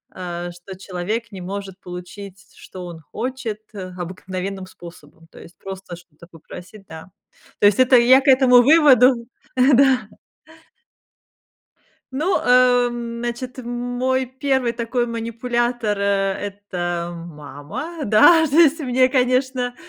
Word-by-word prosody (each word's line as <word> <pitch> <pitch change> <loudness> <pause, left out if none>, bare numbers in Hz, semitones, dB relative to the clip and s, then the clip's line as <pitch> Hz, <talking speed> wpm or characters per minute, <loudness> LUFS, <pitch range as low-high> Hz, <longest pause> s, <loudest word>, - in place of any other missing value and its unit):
э, 175 -1 -6
что 175 +2 -11
человек 205 +5 -4
не 190 - -9
может 195 +1 -7
получить, 185 +2 -10
что 185 - -11
он 170 -2 -9
хочет, 240 - -5
э, 185 -2 -7
обыкновенным 185 +2 -6
способом, 165 -3 -15
то - - -15
есть 170 - -15
просто 190 -2 -8
что-то 170 -2 -18
попросить, 180 +4 -13
да. 160 +3 -11 0.5
То 205 - +6
есть 205 +4 +2
это 255 0 +5
я 255 +3 +6
к - - -9
этому 255 -2 +6
выводу, 260 -5 +5 0.3
э, 260 +2 +4
да. 265 -1 +3 2.1
Ну, 320 +8 0
эм, 245 -2 +2
значит, 240 +2 -5
мой 245 +2 -2
первый 260 -1 -1
такой 240 +1 -2
манипулятор, 235 -1 -2
э, - - -2 0.5
это 175 -4 -4
мама. 165 - -8
Да, 320 - +5
то 285 - -5
есть 320 -1 +5
мне, 255 -2 +2
конечно, 255 -1 0
235 Hz, 125 wpm, -20 LUFS, 185-255 Hz, 2.1 s, То